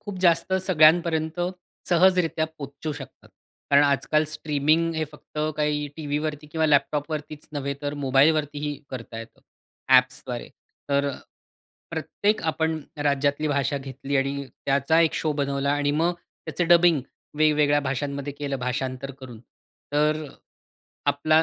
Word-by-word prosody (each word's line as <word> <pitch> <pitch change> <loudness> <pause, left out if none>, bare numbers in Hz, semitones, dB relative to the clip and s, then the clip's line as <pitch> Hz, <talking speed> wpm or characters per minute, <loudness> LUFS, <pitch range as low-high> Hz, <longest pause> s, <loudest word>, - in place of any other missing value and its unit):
खूप 205 -3 -7
जास्त 170 0 +3
सगळ्यांपर्यंत, 160 -1 +4 0.5
सहजरित्या 180 -2 +3
पोहचू 145 +2 -5
शकतात. 145 - -11 0.4
कारण 140 0 +7
आजकाल 150 +2 +2
स्ट्रीमिंग 155 +2 +1
हे 160 0 0
फक्त 150 - -11 0.2
काही 150 -1 0
टीव्हीवरती 150 0 -3
किंवा 160 -1 +2
लॅपटॉपवरतीच 150 +1 0
नव्हे 140 -1 -2
तर, 145 0 -2
मोबाईलवरतीही 145 +2 +2 0.2
करता 115 -3 -7
येतं. 115 0 -11 0.5
अ‍ॅप्सद्वारे. 130 -1 +2 0.4
तर 140 0 +2
अ, 140 - -3 0.8
प्रत्येक 210 +2 -1
आपण 160 0 -1 0.2
राज्यातली 145 +1 +1
भाषा 140 0 0
घेतली 135 +1 -4
आणि 140 +1 -1
त्याचा 140 +5 +1
एक 165 -1 +3
शो 155 - 0
बनवला 140 0 0
आणि 145 0 +1
मग 170 +2 +2
त्याचं 175 0 -5
डबिंग 170 -3 +6 0.4
वेगवेगळ्या 150 -1 +4
भाषांमध्ये 140 +1 -3
केलं 140 -1 -4
भाषांतर 130 +1 -3
करून. 120 -4 -10 0.5
तर 150 +1 +2
अ, - - -8 0.8
आपला 155 +3 +3
145 Hz, 125 wpm, -25 LUFS, 140-160 Hz, 0.8 s, कारण